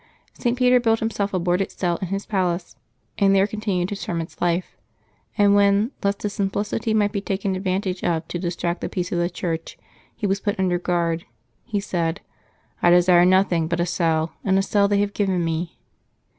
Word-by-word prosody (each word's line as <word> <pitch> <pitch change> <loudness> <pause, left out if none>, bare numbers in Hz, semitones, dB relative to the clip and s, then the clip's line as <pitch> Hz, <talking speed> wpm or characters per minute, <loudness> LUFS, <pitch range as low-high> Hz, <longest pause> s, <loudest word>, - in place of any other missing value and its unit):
St. 240 0 -1
Peter 250 0 +5
built 225 -2 +2
himself 205 -3 -1
a 185 - 0
boarded 180 +2 0
cell 175 -2 -1
in 190 - -4
his 195 +3 -3
palace, 180 -3 -1 0.4
and 195 -1 +4
there 195 0 +5
con 210 +1 -6
tinued 185 -3 -1
his 200 - -4
hermit's 165 -1 -5
life; 175 +1 0 0.6
and 205 -1 +5
when, 200 +3 +3
lest 200 0 -1
his 205 -1 -2
simplicity 205 +2 -1
might 210 -2 +2
be 200 - -2
taken 195 -1 -2
advantage 185 0 -2
of 165 -1 0
to 175 - -4
distract 175 0 -2
the - - -3
peace 180 -2 -3
of 175 - 0
the 175 0 +1
Church, 165 -2 -4 0.4
he - - -4
was 195 0 +1
put 205 0 -2
under 180 -2 +1
guard, 170 -2 -1 0.4
he 215 -4 -1
said, 175 -3 -2
^' - - -43 0.5
I 175 - +5
desired 175 0 +6
nothing 185 -3 +3
but 170 +1 -2
a 175 - +2
cell, 165 -2 0
and 190 -1 +2
a 195 - +2
cell 200 0 +2
they 200 0 +2
have 205 0 -1
given 190 -4 0
me." 165 +1 -3
190 Hz, 200 wpm, -23 LUFS, 175-200 Hz, 0.6 s, desired